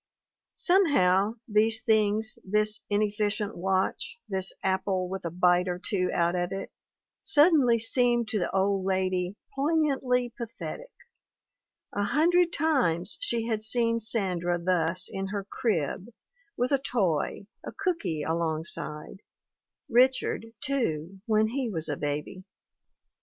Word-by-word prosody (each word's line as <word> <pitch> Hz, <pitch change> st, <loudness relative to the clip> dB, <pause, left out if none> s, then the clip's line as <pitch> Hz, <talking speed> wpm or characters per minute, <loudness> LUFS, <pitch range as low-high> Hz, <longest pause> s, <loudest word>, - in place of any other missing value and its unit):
Somehow 220 Hz, -, +3 dB
these 220 Hz, +2 st, +2 dB
things, 220 Hz, -1 st, +1 dB
this 210 Hz, +2 st, +1 dB
inefficient 210 Hz, 0 st, -1 dB
watch, 190 Hz, +4 st, -1 dB
this 190 Hz, -2 st, -1 dB
apple 190 Hz, -1 st, 0 dB
with 190 Hz, +1 st, -5 dB
a -, -, -1 dB
bite 180 Hz, +1 st, +2 dB
or 180 Hz, -1 st, -2 dB
two 180 Hz, 0 st, -1 dB
out 170 Hz, 0 st, +1 dB
of 175 Hz, 0 st, -1 dB
it, 195 Hz, 0 st, -5 dB, 0.5 s
sud 330 Hz, -2 st, +5 dB
denly 245 Hz, -6 st, +4 dB
seemed 240 Hz, 0 st, +1 dB
to 215 Hz, -, 0 dB
the 175 Hz, -, -1 dB
old 195 Hz, 0 st, +1 dB
lady 185 Hz, 0 st, -1 dB, 0.2 s
poignantly 275 Hz, -5 st, +1 dB
pathetic; 260 Hz, -, -7 dB, 1.0 s
a 205 Hz, -, -1 dB
hundred 335 Hz, +10 st, +3 dB
times 240 Hz, -, 0 dB
she 235 Hz, -, -1 dB
had 220 Hz, -2 st, -1 dB
seen 230 Hz, +1 st, +1 dB
Sandra 185 Hz, -6 st, 0 dB
thus 175 Hz, 0 st, +1 dB
in 195 Hz, 0 st, -4 dB
her 200 Hz, 0 st, -4 dB
crib, 190 Hz, -, -2 dB, 0.5 s
with 245 Hz, +2 st, 0 dB
a 275 Hz, -, +3 dB
toy, 200 Hz, -, -1 dB, 0.2 s
a -, -, -6 dB
cooky 335 Hz, -, -2 dB
alongside; 160 Hz, +1 st, -2 dB, 0.7 s
Richard, 250 Hz, -1 st, +2 dB
too, 195 Hz, -, -2 dB
when 215 Hz, 0 st, +3 dB
he 255 Hz, 0 st, -2 dB
was 165 Hz, -6 st, -1 dB
a 145 Hz, -, -2 dB
baby. 150 Hz, +6 st, -4 dB
205 Hz, 125 wpm, -27 LUFS, 180-240 Hz, 1.0 s, sud